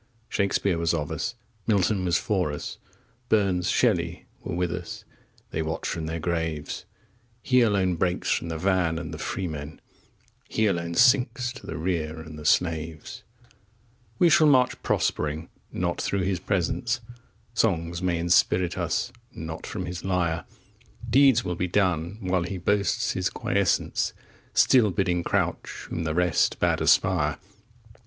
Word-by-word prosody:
Shakespeare 100 Hz, -3 st, +1 dB
was 85 Hz, 0 st, +1 dB
of 75 Hz, 0 st, -3 dB
us, 80 Hz, +10 st, -3 dB, 0.3 s
Milton 100 Hz, -2 st, +2 dB
was 85 Hz, -3 st, +3 dB
for 90 Hz, -4 st, 0 dB
us, 75 Hz, -, -6 dB, 0.5 s
Burns, 95 Hz, -5 st, +2 dB
Shelley, -, -, +1 dB, 0.2 s
were -, -, -4 dB
with 90 Hz, -1 st, 0 dB
us 85 Hz, -1 st, -6 dB, 0.5 s
they 80 Hz, -, -1 dB
watch 80 Hz, +1 st, -3 dB
from 80 Hz, -1 st, -3 dB
their 80 Hz, +1 st, -3 dB
graves! 80 Hz, -2 st, -3 dB, 0.6 s
He 125 Hz, -1 st, +4 dB
alone 95 Hz, -6 st, +2 dB
breaks 90 Hz, +1 st, 0 dB
from 85 Hz, -, 0 dB
the 80 Hz, -, -3 dB
van 90 Hz, -2 st, +1 dB
and 80 Hz, -1 st, -5 dB
the 75 Hz, -, -7 dB
freemen, 80 Hz, -5 st, -4 dB, 0.7 s
15 -, -, -14 dB
He 110 Hz, -, +4 dB
alone 85 Hz, -4 st, -1 dB
sinks 125 Hz, +1 st, +3 dB
to 130 Hz, -, -12 dB
the -, -, -4 dB
rear 80 Hz, -2 st, -2 dB
and 80 Hz, -1 st, -9 dB
the 75 Hz, -, -10 dB
slaves! 80 Hz, -1 st, 0 dB, 1.0 s
We 175 Hz, -, +5 dB
shall 165 Hz, -1 st, +6 dB
march 130 Hz, -3 st, +3 dB
prospering 75 Hz, +2 st, -1 dB, 0.2 s
not 85 Hz, -1 st, -2 dB
through 100 Hz, -, 0 dB
his 95 Hz, -1 st, 0 dB
presence; 120 Hz, +8 st, -1 dB, 0.5 s
Songs 85 Hz, -6 st, 0 dB
may 90 Hz, -2 st, +1 dB
inspirit 85 Hz, +1 st, +2 dB
us -, -, -1 dB, 0.2 s
not 80 Hz, 0 st, -6 dB
from -, -, -4 dB
his 90 Hz, 0 st, -6 dB
lyre; 85 Hz, -3 st, 0 dB, 0.6 s
Deeds 135 Hz, -4 st, +5 dB
will 90 Hz, -, -1 dB
be 90 Hz, +2 st, -1 dB
done 90 Hz, -1 st, 0 dB
while 95 Hz, -1 st, +1 dB
he 90 Hz, +3 st, -4 dB
boasts 100 Hz, +3 st, +1 dB
his -, -, 0 dB
quiescence, -, -, 0 dB, 0.4 s
Still 120 Hz, -5 st, +5 dB
bidding 90 Hz, -2 st, 0 dB
crouch -, -, -2 dB
whom 85 Hz, -, -2 dB
the 80 Hz, 0 st, -1 dB
rest 90 Hz, -1 st, +2 dB
bade -, -, +2 dB
aspire. -, -, +3 dB
90 Hz, 150 wpm, -26 LUFS, 80-100 Hz, 1.0 s, shall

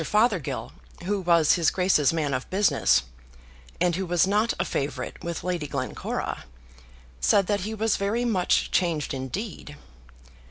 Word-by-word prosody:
Fothergill, 210 Hz, -, 0 dB, 0.3 s
who 200 Hz, +2 st, -1 dB
was 170 Hz, -3 st, +4 dB
his 170 Hz, -4 st, +3 dB
Grace's 180 Hz, -6 st, +2 dB
man 155 Hz, -4 st, -1 dB
of 130 Hz, 0 st, -3 dB
business, 185 Hz, -, +3 dB, 0.8 s
and 175 Hz, -2 st, +2 dB
who 190 Hz, 0 st, -3 dB
was 175 Hz, 0 st, +3 dB
not 210 Hz, +4 st, +2 dB
a -, -, +1 dB
favourite 140 Hz, +1 st, -4 dB
with 170 Hz, -1 st, -4 dB
Lady 175 Hz, -4 st, -2 dB
Glencora, 140 Hz, -2 st, -4 dB, 0.7 s
said 195 Hz, -, +3 dB
that 205 Hz, +1 st, 0 dB
he 215 Hz, +4 st, -4 dB
was 220 Hz, 0 st, +1 dB
very 215 Hz, +5 st, -1 dB
much 190 Hz, -7 st, +1 dB
changed 165 Hz, -6 st, 0 dB
indeed. 145 Hz, -, -6 dB
180 Hz, 145 wpm, -25 LUFS, 150-205 Hz, 0.8 s, was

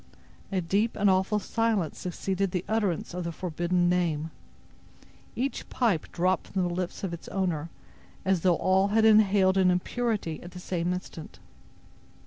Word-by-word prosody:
A 190 Hz, -2 st, 0 dB
deep 200 Hz, +7 st, 0 dB
and 200 Hz, -1 st, +3 dB
awful 190 Hz, +3 st, +2 dB
silence 215 Hz, -4 st, -1 dB
succeeded 190 Hz, +2 st, -2 dB
the 180 Hz, 0 st, -3 dB
utterance 205 Hz, -7 st, -1 dB
of 180 Hz, 0 st, -3 dB
the 170 Hz, -, -3 dB
forbidden 175 Hz, +1 st, 0 dB
name. 165 Hz, -3 st, 0 dB, 1.0 s
Each 270 Hz, +3 st, -3 dB
pipe 220 Hz, -11 st, 0 dB
dropped 185 Hz, 0 st, 0 dB
from 190 Hz, -2 st, -1 dB
the 175 Hz, -1 st, -1 dB
lips 180 Hz, +1 st, -4 dB
of 185 Hz, -3 st, -2 dB
its 170 Hz, -, -8 dB
owner 170 Hz, -5 st, -2 dB, 0.6 s
as 190 Hz, -3 st, +2 dB
though 180 Hz, -1 st, +4 dB
all 190 Hz, +3 st, +2 dB
had 220 Hz, +2 st, +3 dB
inhaled 200 Hz, -3 st, +5 dB
an 185 Hz, -1 st, +5 dB
impurity 195 Hz, -1 st, -1 dB
at 175 Hz, 0 st, -10 dB
the 180 Hz, -, -8 dB
same 175 Hz, -1 st, -2 dB
instant. 180 Hz, -3 st, -7 dB
185 Hz, 155 wpm, -28 LUFS, 175-200 Hz, 1.0 s, inhaled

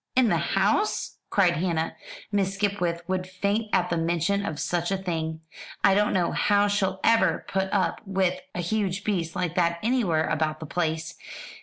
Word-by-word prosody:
"In 255 Hz, -3 st, +4 dB
the -, -, +3 dB
house!" 420 Hz, +1 st, 0 dB
cried 180 Hz, -5 st, +3 dB
Hannah. 165 Hz, -1 st, -1 dB, 0.4 s
"Miss 195 Hz, -1 st, 0 dB
Skipwith 185 Hz, -4 st, -1 dB
would 185 Hz, -1 st, -1 dB
faint 200 Hz, +4 st, -1 dB
at 180 Hz, 0 st, +1 dB
the 170 Hz, -, +1 dB
mention 170 Hz, +4 st, 0 dB
of 155 Hz, -6 st, -4 dB
such 175 Hz, -1 st, -1 dB
a 195 Hz, -, 0 dB
thing. 160 Hz, -4 st, -3 dB, 0.4 s
I -, -, +6 dB
don't 210 Hz, +1 st, +3 dB
know 180 Hz, -2 st, +1 dB
how 205 Hz, 0 st, +3 dB
she'll 195 Hz, -2 st, 0 dB
ever 190 Hz, -7 st, +3 dB
put 190 Hz, 0 st, -1 dB
up 195 Hz, -2 st, 0 dB
with 190 Hz, -1 st, +1 dB, 0.2 s
a 180 Hz, -, -1 dB
huge 200 Hz, +1 st, -1 dB
beast 170 Hz, -6 st, -1 dB
like 180 Hz, -2 st, -1 dB
that 170 Hz, -1 st, +1 dB
anywhere 210 Hz, -10 st, +1 dB
about 155 Hz, 0 st, -1 dB
the 160 Hz, -, -6 dB
place. 160 Hz, +1 st, -2 dB
185 Hz, 175 wpm, -26 LUFS, 170-200 Hz, 0.4 s, I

